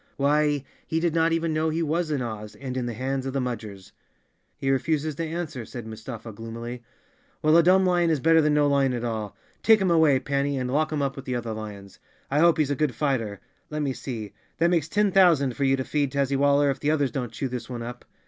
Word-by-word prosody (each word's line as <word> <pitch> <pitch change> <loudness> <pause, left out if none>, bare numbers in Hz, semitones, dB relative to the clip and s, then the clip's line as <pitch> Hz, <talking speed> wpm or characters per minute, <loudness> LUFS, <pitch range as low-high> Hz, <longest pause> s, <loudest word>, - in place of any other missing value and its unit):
Why, 145 0 +2 0.2
he 160 - 0
did 170 -1 0
not 165 0 +2
even 165 -1 0
know 155 +1 +1
he 165 +2 -1
was 165 +2 0
in 145 -4 -1
Oz, 105 -2 -6
and 130 +3 -6
in 125 -2 -2
the 120 - -4
hands 135 +2 -2
of 135 - -4
the 140 - 0
Mudgers. 110 -6 -5 0.7
"He 135 - 0
refuses 155 +3 0
to 165 - -4
answer," 155 -6 -4
said 120 0 -8
Mustafa 110 +1 -8
gloomily. 115 +3 -7 0.6
"Well, 155 +1 +5
a 170 - +8
dumb 185 +3 +4
lion 175 -2 +3
is 155 -3 +1
better 165 +3 +5
than 150 -1 +2
no 150 0 +4
lion 140 -3 +2
at 120 - -4
all. 110 -3 -4 0.2
Take 220 -1 +6
him 190 -3 +1
away, 160 -5 +5
Panny, 140 +1 -1
and 125 -1 -2
lock 155 +3 +1
him 150 -2 0
up 135 0 -1
with 135 - -8
the 125 - -2
other 120 -2 -3
lions. 105 -3 -8 0.3
I 145 - +2
hope 170 +1 +5
he's 150 -3 +1
a - - +1
good 140 -3 0
fighter. 115 -9 -1 0.3
Let 150 0 -2
me 135 -2 -1
see, 110 -7 -6 0.2
that 170 +2 +3
makes 160 -3 +1
ten 205 +1 +2
thousand 165 -10 +4
for 140 - 0
you 135 0 +4
to 130 - -2
feed, 145 -1 -1
Tazzywaller, 140 +1 +2
if 135 - -5
the 145 - 0
others 145 -4 +1
don't 125 -2 -3
chew 135 - -3
this 125 -1 -6
one 120 -2 -5
up." 120 +1 -7
140 Hz, 240 wpm, -25 LUFS, 120-155 Hz, 0.7 s, a